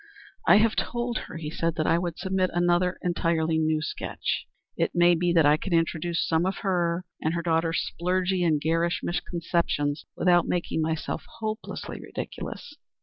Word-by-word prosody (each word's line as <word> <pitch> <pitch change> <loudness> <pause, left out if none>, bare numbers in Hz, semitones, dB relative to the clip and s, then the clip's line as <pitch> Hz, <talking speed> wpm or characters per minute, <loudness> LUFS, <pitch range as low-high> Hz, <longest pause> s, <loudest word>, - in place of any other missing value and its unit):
"I - - +8
have 220 +1 +3
told 240 -1 -1
her," - - -7
he 155 -2 -5
said, 165 0 -1
"that 155 - 0
I 165 +1 +3
would 175 -2 -3
submit 190 0 0
another 175 +1 +2
entirely 165 -2 +1
new 155 -1 +1
sketch. - - -3 0.3
It - - -1
may 175 0 +6
be 175 +1 +1
that 165 -3 +5
I 150 +1 +5
can 185 +3 -4
introduce 165 0 +1
some 160 0 +2
of 190 - -2
her 175 -1 +1 0.2
and 160 +2 0
her 170 - -2
daughter's 165 0 +1
splurgy 180 +1 0
and 160 -3 +3
garish 165 +3 +1
misconceptions 170 -4 -1
without 175 0 +4
making 175 -2 -1
myself 160 0 -2
hopelessly 220 0 -5
ridiculous." 295 - -7
170 Hz, 165 wpm, -26 LUFS, 160-180 Hz, 0.3 s, I